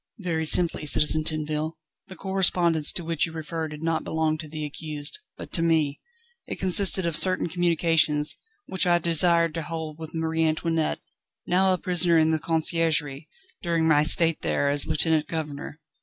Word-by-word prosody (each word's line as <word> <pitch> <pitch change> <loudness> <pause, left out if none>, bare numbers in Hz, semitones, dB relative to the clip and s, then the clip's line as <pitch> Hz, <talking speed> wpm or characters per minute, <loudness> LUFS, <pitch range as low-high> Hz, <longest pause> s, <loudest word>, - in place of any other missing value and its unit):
"Very 170 -6 -3
simply, 165 -1 +2
Citizen 155 +2 +3
Tinville. 155 0 -2 0.3
The 190 - -11
correspondence 175 -5 +2
to 175 - -3
which 165 -1 -1
you - - -10
refer 160 0 -5
did 150 +1 -10
not 165 -1 -1
belong 160 -1 -1
to 155 - -8
the 155 0 -6
accused, 150 - -6 0.2
but - - -11
to 165 - +1
me. 160 -4 0 0.5
It - - -5
consisted 190 0 +3
of 170 -2 -2
certain 185 +2 +1
communications, 165 -3 +1 0.3
which 190 -1 -2
I 175 0 +3
desired 170 0 +4
to 165 - -4
hold 160 -1 -7
with 160 0 -9
Marie 160 0 -1
Antoinette, 160 0 -1 0.4
now 190 +2 +2
a 185 - +1
prisoner 175 -2 +1
in 160 0 +2
the 160 - 0
Conciergerie, 160 -3 -1 0.3
during 165 -2 -1
my 150 -2 +4
state 165 +1 +4
there 140 - -1
as 145 0 +2
lieutenant 155 0 +1
governor. 150 -1 -6
160 Hz, 170 wpm, -24 LUFS, 155-170 Hz, 0.5 s, desired